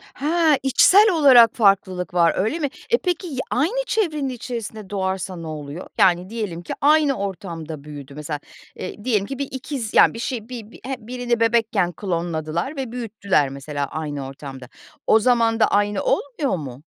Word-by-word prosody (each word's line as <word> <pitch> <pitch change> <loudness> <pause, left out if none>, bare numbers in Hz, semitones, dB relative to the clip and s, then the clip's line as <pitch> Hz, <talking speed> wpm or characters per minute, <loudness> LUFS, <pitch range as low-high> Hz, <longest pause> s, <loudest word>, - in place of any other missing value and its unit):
Ha! 315 0 +2
İçsel 395 - +6
olarak 255 -7 +7
farklılık 190 -4 +2
var, 170 -2 +4
öyle 220 - 0
mi? 285 - -1 0.2
E, 475 - +4
peki, 360 -2 -2
ya 270 -5 -5
aynı 440 - 0
çevrenin 305 -10 0
içerisinde 225 -4 -6
doğarsa 190 -1 -2
ne 165 -1 -7
oluyor? 150 +2 -7
Yani, 180 0 +3
diyelim 210 -7 -4
ki 175 - -5
aynı 295 -1 +4
ortamda 170 - -6
büyüdü 145 -2 -10
mesela, 150 0 -5 0.4
eee, 205 +3 -7
diyelim 215 -6 +1
ki 270 +4 -6
bir 280 - -2
ikiz, 260 -3 -5
yani, - - +6
bir 230 - -7
şey, 235 -1 -4
bi 230 -3 -8
bi - - -14
h 265 0 -2
birini 245 -1 -1
bebekken 225 -5 +2
klonladılar 170 - -3
ve 265 -4 -4
büyüttüler 205 - 0
mesela 140 +1 -4
aynı 145 -3 -5
ortamda. 135 -2 -9 0.4
O 220 - +6
zaman 230 -1 +2
da - - +6
aynı 205 -1 +1
olmuyor 275 -2 0
mu? 135 -2 -8
215 Hz, 170 wpm, -22 LUFS, 170-260 Hz, 0.4 s, olarak